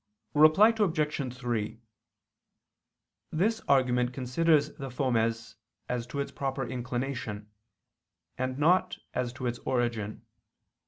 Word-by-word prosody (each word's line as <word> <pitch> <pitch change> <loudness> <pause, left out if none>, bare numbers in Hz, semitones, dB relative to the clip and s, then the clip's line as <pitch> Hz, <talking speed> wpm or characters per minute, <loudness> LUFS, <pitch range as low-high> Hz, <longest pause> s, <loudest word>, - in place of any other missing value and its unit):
Reply 155 +10 +7
Obj. 150 - 0
3: 115 -3 -2 1.5
This 215 +8 +1
argument 125 -2 +3
considers 150 +4 +2
the 135 -2 -5
fomes 115 -4 -1 0.3
as 125 -1 -2
to 140 - -5
its 140 - -2
proper 135 -1 -2
inclination, 120 -4 -4 0.8
and 130 0 -2
not 175 +6 +3 0.2
as 125 -1 -1
to 130 - -6
its 120 0 -2
origin. 120 -4 -2
130 Hz, 105 wpm, -29 LUFS, 120-150 Hz, 1.5 s, Reply